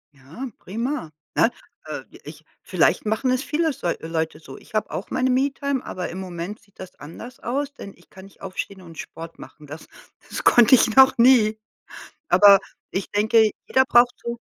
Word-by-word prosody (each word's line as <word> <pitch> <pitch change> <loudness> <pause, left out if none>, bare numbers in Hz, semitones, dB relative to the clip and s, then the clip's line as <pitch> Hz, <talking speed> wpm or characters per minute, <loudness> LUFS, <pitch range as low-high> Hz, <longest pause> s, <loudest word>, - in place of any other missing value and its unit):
Ja, 140 - -9
prima, 230 - -4 0.2
ne? 230 - +4 0.4
Äh, - - -6 0.2
ich - - -12 0.2
vielleicht - - +1
machen 220 +4 0
es 255 +3 0
viele 320 +1 0
s 275 - -7 0.2
Leute 160 -1 -3
so. 135 -4 -12
Ich - - -15
habe 215 - -1
auch - - -5
meine 255 0 0
Me-Time, 275 0 -1
aber 180 -2 -5
im 185 - -7
Moment 185 +2 -6
sieht 200 - -30
das 185 -1 -9
anders 230 +11 -11
aus, 280 +4 -3
denn 200 -7 -10
ich - - -25
kann 190 0 -13
nicht 195 - -19
aufstehen 190 0 -6
und 165 -2 -13
Sport 165 0 -9
machen. 150 - -13
Das 155 +3 -10 0.4
das - - -5
konnte 240 +1 +7
ich 225 -1 +2
noch 265 -1 +7
nie. 230 -3 +5 0.7
Aber 200 +1 +7 0.3
ich 190 - -3
denke, 215 +1 +3 0.2
jeder 265 0 +3
braucht 245 0 +4
so 235 0 -5
215 Hz, 180 wpm, -23 LUFS, 180-255 Hz, 0.7 s, konnte